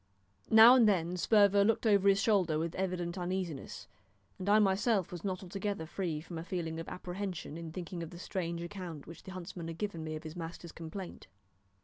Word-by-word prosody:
Now 225 +2 +10
and 240 -4 +6
then 180 -3 +1
Sperver 200 +1 +5
looked 225 +3 +1
over 200 -2 +5
his 195 0 +4
shoulder 190 -8 +2
with 165 +1 -2
evident 180 -1 -2
uneasiness; 180 -5 -4 0.5
and 190 +2 -2
I 210 - +6
myself 200 -1 +2
was 175 -2 -7
not 190 -2 -3
altogether 195 -1 -3
free 165 -2 -3
from 165 0 -7
a - - -5
feeling 165 -2 -3
of 165 - -6
apprehension 180 -4 -5
in 165 -1 -6
thinking 175 0 -6
of 165 - -5
the 175 - -10
strange 170 -2 -3
account 170 -5 -7
which 165 - -11
the 190 - -10
huntsman 180 -2 -7
had 165 -1 -6
given 200 -6 -3
me 155 0 -4
of 155 - -7
his 155 0 -8
master's 170 0 -7
complaint. 170 - -8
180 Hz, 200 wpm, -32 LUFS, 165-195 Hz, 0.5 s, Now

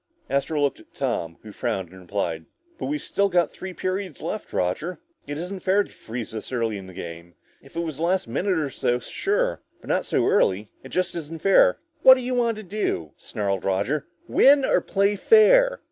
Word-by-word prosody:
Astro 140 +3 0
looked 140 -1 +1
at - - -20
Tom, 85 0 -2
who 110 - -10
frowned 95 -3 -3
and 95 - -12
replied, 85 -4 -3 0.3
"But - - -3
we've 300 +2 -1
still 200 0 +1
got 175 -3 +2
three 190 - -7
periods 185 -1 -3
left, - - -5
Roger. 125 - -1 0.3
It 145 - -4
isn't 180 +4 -5
fair 195 +2 +3
to - - -15
freeze 115 0 -7
this 110 +2 -7
early 115 -4 -1
in 95 - -10
the 95 - -11
game. 85 +1 -8 0.3
If - - -18
it 170 - -1
was 160 -4 -4
the - - -7
last 180 -1 +1
minute 180 - 0
or 150 -3 -1
so, 120 -1 0
sure. 415 - -1 0.2
But - - -13
not - - 0
so - - +1
early. 105 - +2
It 130 - -11
just 185 +3 -1
isn't 165 -1 -7
fair." - - +5 0.2
"What 260 - +10
do 255 - -4
you 255 +1 -2
want 235 -3 +1
to 215 - -7
do?" 185 - -2
snarled 100 -3 -3
Roger. 100 +11 0 0.2
"Win, 275 0 +5
or - - +3
play 200 +1 +1
fair?" - - +5
165 Hz, 205 wpm, -24 LUFS, -, 0.3 s, What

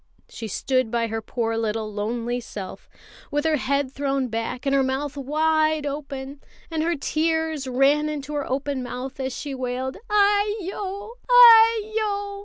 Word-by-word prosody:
She 225 - -7
stood 255 +3 0
by 235 0 0
her 225 0 -3
poor 225 0 -2
little 220 -1 -2
lonely 235 +4 -2
self, 200 -5 -8 0.4
with 295 +1 -1
her 315 -1 +3
head 280 0 -1
thrown 275 -2 -1
back 230 +4 -4
and 275 - +1
her 275 - +4
mouth 265 +2 -2
wide 310 +2 +1
open, 280 -1 -6 0.3
and 320 -1 -1
her 335 +2 +1
tears 320 -1 -1
ran 275 +4 +3
into 295 -1 -5
her 290 -1 -3
open 275 0 -2
mouth 250 +2 -6
as 265 0 -2
she 285 -2 -5
wailed: 255 0 -3
"Aiyo! 410 0 0 0.2
Aiyo! 440 -4 +5
280 Hz, 150 wpm, -24 LUFS, 255-320 Hz, 0.4 s, Aiyo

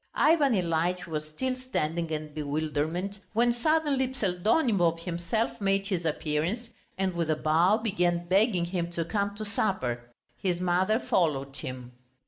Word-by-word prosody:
Ivan 300 -4 +4
Ilyitch 175 0 0
was 155 -2 -4
still 255 +11 -2
standing 170 -10 -2
in 155 -1 -4
bewilderment, 155 +6 -2
when 240 +2 +3
suddenly 290 0 +2
Pseldonimov 195 - +2
himself 175 +7 -2
made 195 0 +1
his 185 -4 -2
appearance, 160 +9 -1 0.3
and 190 -1 0
with 170 -2 -1
a 155 - +3
bow, 165 +7 +3
began 180 -6 0
begging 190 -1 +3
him 175 -1 -2
to 165 -1 -1
come 200 +2 -1
to 215 +1 -5
supper. 125 - -1 0.3
His 180 -2 0
mother 185 +4 +2
followed 140 - 0
him. 125 -1 -6
180 Hz, 140 wpm, -28 LUFS, 160-215 Hz, 0.3 s, Ivan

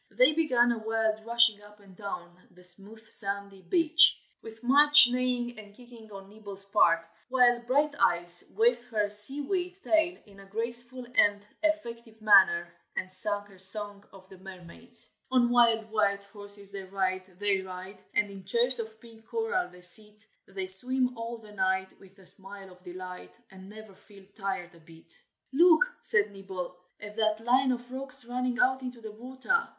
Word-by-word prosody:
Then 255 +8 +3
began 255 -7 +2
a 235 - -3
wild 220 0 -2
rushing 235 -3 +4
up 210 0 -18
and 195 -2 -19
down 180 -3 -9
the 180 - -21
smooth 200 +5 -3
sandy 200 -2 -2
beach, 330 - +3 0.2
with 225 +1 -13
much 290 +1 +6
neighing 245 -1 -2
and 205 -1 -15
kicking 235 -3 -16
on 195 -1 -11
Nibble's 200 -1 -5
part, 170 -5 +2 0.2
while 250 -2 +3
Brighteyes 235 -10 -1
waved 240 +3 0
her 210 -4 -2
seaweed 290 - -3
tail 325 +2 +1
in 200 -2 -18
a 195 - -15
graceful 240 +4 -6
and 205 -3 +2 0.2
effective 235 -8 -4
manner, 190 -5 +4 0.2
and 185 - -5
sang 205 +2 +1
her 195 -2 -19
song 205 +1 +3
of 190 -1 -17
the 190 -1 -16
mermaids. 185 -3 -14 0.2
"On 250 -2 +2
wild 230 -2 +2
white 200 -2 0
horses 200 0 +1
they 195 -1 -7
ride, 185 -1 -4
they 200 -1 0
ride, 190 +1 -10
And 205 -1 0
in 195 -1 -12
chairs 235 +6 +3
of 220 -1 -8
pink 225 -1 -18
coral 450 -6 -2
they 180 - -17
sit, 210 +4 +3 0.2
They 190 -1 -6
swim 250 +7 +4
all 230 +1 -7
the 215 -2 -16
night, 190 -1 -2
with 195 0 -20
a 190 - -19
smile 195 +1 +2
of 180 0 -19
delight, 180 - -10 0.2
And 190 0 -14
never 215 -1 -13
feel 200 0 -19
tired 190 -4 -5
a 170 - -19
bit." 165 0 -19 0.4
"Look!" 340 - +5 0.2
said 210 -1 0
Nibble, 190 -2 -8 0.2
"at 205 0 -10
that 220 0 -1
line 260 +2 +2
of 245 0 -6
rocks 260 -2 +3
running 250 0 -3
out 260 +1 +1
into 250 -2 -8
the 220 -1 -9
water. 260 - -3
215 Hz, 170 wpm, -27 LUFS, 195-245 Hz, 0.4 s, much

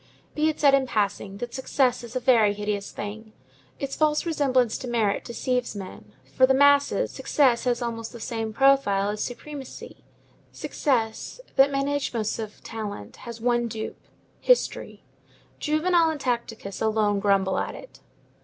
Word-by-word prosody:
Be 310 +1 +2
it 310 - -4
said 280 -2 +5
in 270 -1 +3
passing, 200 -3 -1
that 240 +3 -6
success 260 -2 +1
is 235 +1 -10
a - - +1
very 230 -5 +4
hideous 205 -1 -3
thing. 215 +2 -7 0.4
Its 275 -1 -4
false 305 0 +2
resemblance 260 -8 +2
to 255 - -6
merit 225 -4 0
deceives 250 -1 -2
men. 185 - -9 0.2
For 260 - +6
the 265 - +4
masses, 285 +1 +4
success 260 -5 +2
has 245 0 +1
almost 230 -1 -4
the 235 - -10
same 225 0 -3
profile 215 -6 +3
as 210 0 -2
supremacy. 270 +2 -8 0.5
Success, 230 - -2 0.2
that 270 +1 +6
Menæchmus 275 -6 -1
of 215 -1 -7
talent, 205 - -6
has 235 -1 -7
one 240 0 +1
dupe,—history. 225 - -2 0.6
Juvenal 325 +2 +2
and 315 -2 -3
Tacitus 235 -6 -3
alone 215 -2 +2
grumble 195 -2 +2
at - - -3
it. - - -12
240 Hz, 145 wpm, -25 LUFS, 215-275 Hz, 0.6 s, For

